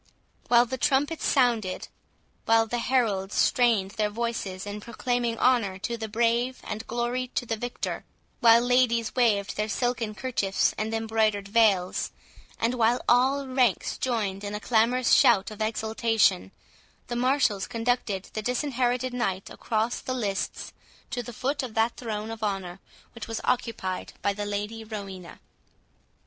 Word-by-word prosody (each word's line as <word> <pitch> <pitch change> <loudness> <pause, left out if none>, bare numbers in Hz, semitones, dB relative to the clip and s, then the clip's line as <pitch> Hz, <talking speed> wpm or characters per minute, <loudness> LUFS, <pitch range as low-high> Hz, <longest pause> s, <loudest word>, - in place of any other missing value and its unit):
While 240 0 +5
the 260 +1 -5
trumpets 290 +4 +1
sounded, 235 -8 +1 0.6
while 225 0 +4
the 240 +2 -2
heralds 215 -7 0
strained 225 -6 +3
their 210 0 0
voices 210 -4 -3
in 205 +1 -6
proclaiming 240 0 -2
honour 230 -7 +2
to 235 +4 -3
the 225 -1 -5
brave 235 +3 +1
and 215 +1 -6
glory 240 +2 -1
to 245 - 0
the 225 - -1
victor—while 235 0 +1
ladies 245 -2 +2
waved 215 -6 +2
their 210 +1 -1
silken 235 -2 -1
kerchiefs 210 -6 0
and 215 +1 -2
embroidered 220 -2 0
veils, 200 -4 +2 0.5
and 230 +2 +1
while 240 0 +2
all 265 +3 +3
ranks 255 -6 +1
joined 210 -6 -1
in 205 0 -4
a - - -3
clamorous 235 +3 +2
shout 205 -3 +5
of 215 0 -8
exultation, 220 -3 +1 0.5
the 240 - -5
marshals 250 -5 +1
conducted 230 -4 -1
the 215 - -3
Disinherited 250 0 -1
Knight 195 -6 -2
across 225 +1 -1
the 255 - -4
lists 205 -6 -3 0.4
to 245 - -2
the 240 - -8
foot 270 +5 -2
of 245 -4 -6
that 225 +1 +2
throne 220 -2 -4
of 225 - -7
honour 195 -3 -3 0.3
which 230 - -8
was 225 -1 -3
occupied 230 -7 -2
by 200 - +2
the 205 0 -4
Lady 210 +2 -4
Rowena. 200 -5 -8
225 Hz, 145 wpm, -27 LUFS, 210-245 Hz, 0.6 s, While